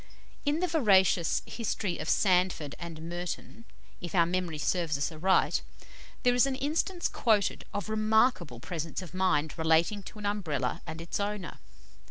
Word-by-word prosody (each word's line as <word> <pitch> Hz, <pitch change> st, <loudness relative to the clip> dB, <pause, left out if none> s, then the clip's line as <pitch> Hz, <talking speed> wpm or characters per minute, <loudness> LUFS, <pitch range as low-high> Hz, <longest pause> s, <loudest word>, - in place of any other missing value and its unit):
'" -, -, -28 dB
In 300 Hz, +3 st, +1 dB
the 365 Hz, -, +2 dB
veracious 195 Hz, -, +3 dB
"History 210 Hz, -5 st, -3 dB
of 155 Hz, -, -4 dB
Sandford 180 Hz, -6 st, +2 dB
and 165 Hz, -2 st, -7 dB
Merton," 175 Hz, +6 st, -6 dB, 0.4 s
if 175 Hz, -1 st, -5 dB
our 170 Hz, -2 st, +5 dB
memory 175 Hz, -2 st, -2 dB
serves 165 Hz, -1 st, 0 dB
us 145 Hz, +4 st, -1 dB
aright, 180 Hz, +5 st, +2 dB, 0.6 s
there 245 Hz, -, +4 dB
is 245 Hz, +2 st, +4 dB
an 270 Hz, -, -1 dB
instance 315 Hz, +6 st, -1 dB
quoted 215 Hz, -4 st, +1 dB
of 205 Hz, -, -4 dB
remarkable 215 Hz, -, +2 dB
presence 165 Hz, +5 st, -5 dB
of 180 Hz, -, -11 dB
mind 185 Hz, -5 st, +1 dB
relating 160 Hz, +6 st, +3 dB
to 205 Hz, -, -11 dB
an 210 Hz, -, -7 dB
Umbrella 155 Hz, -11 st, -1 dB
and 160 Hz, +1 st, -6 dB
its 165 Hz, -, -4 dB
owner. 205 Hz, -3 st, -4 dB
185 Hz, 160 wpm, -29 LUFS, 165-215 Hz, 0.6 s, our